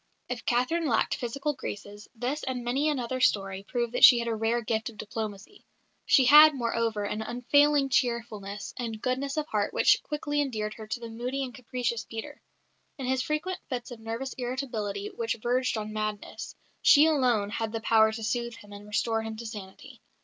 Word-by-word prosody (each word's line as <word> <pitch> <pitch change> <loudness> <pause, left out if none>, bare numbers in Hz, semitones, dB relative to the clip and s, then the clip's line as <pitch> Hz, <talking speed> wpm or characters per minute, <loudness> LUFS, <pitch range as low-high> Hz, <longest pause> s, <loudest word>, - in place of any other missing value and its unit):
'" - - -47
If 245 -2 -5
Catherine 300 +7 +1
lacked 230 -4 +2
physical 275 +3 -2
graces, 205 -4 -8
this 255 +6 -2
and 255 -2 -3
many 270 +6 +1
another 255 -3 -2
story 195 -5 +1
prove 235 +3 -2
that 245 - -1
she 245 - +11
had 235 0 -2
a 230 - 0
rare 225 +2 0
gift 220 0 -1
of 225 - -14
diplomacy. 215 - -6 0.4
She 265 - +6
had, 300 +3 +9
moreover, 230 -3 -1
an 210 +1 -3
unfailing 275 +5 +3
cheerfulness 220 -5 -2
and 230 -3 -4
goodness 265 +4 -2
of 305 - 0
heart 205 -1 -1
which - - +4
quickly 295 -1 -2
endeared 215 -6 -2
her 220 -1 -10
to 220 +3 -3
the 235 - -7
moody 250 +4 -3
and 255 -2 -6
capricious 240 -2 -3
Peter. 285 +6 -8 0.6
In 270 - -5
his 260 0 +1
frequent 305 +6 -2
fits 250 -2 -4
of 240 - -8
nervous 230 +4 -5
irritability 225 -6 -3
which 230 -1 -2
verged 250 +1 0
on 215 0 -5
madness, 215 -1 -4 0.3
she 295 +1 +7
alone 250 -10 +2
had 225 0 -2
the 225 - -3
power 220 -1 +4
to 220 0 -6
soothe 235 +1 -2
him 205 -2 -14
and 205 +1 -10
restore 225 +2 0
him 220 0 -5
to 235 +2 -8
sanity. 205 -4 -9
235 Hz, 190 wpm, -28 LUFS, 220-260 Hz, 0.6 s, she